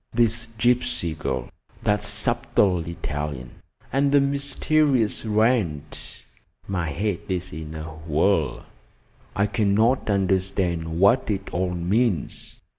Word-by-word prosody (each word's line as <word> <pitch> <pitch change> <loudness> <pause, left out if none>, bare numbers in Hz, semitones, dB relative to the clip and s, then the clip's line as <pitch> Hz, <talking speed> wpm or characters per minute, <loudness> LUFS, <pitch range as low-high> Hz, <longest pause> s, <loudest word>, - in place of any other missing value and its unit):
this 115 0 +2
gypsy 120 -7 +1
girl, 65 -2 -3 0.4
that 105 0 +2
subtle 95 -2 +1
Italian, 75 -6 -4 0.4
and 140 +1 +2
the 145 - +6
mysterious 140 -3 +1
Wrent! 110 - 0 0.4
My 90 -5 -2
head 95 +5 -1
is 90 -2 -3
in 80 0 -7
a 80 - -5
whirl. 80 -1 0 0.7
I 100 - +2
cannot 110 +5 +2
understand 95 -4 0
what 110 +7 +4
it 100 -2 -3
all 90 0 -1
means. 95 - -1
100 Hz, 110 wpm, -24 LUFS, 80-115 Hz, 0.7 s, the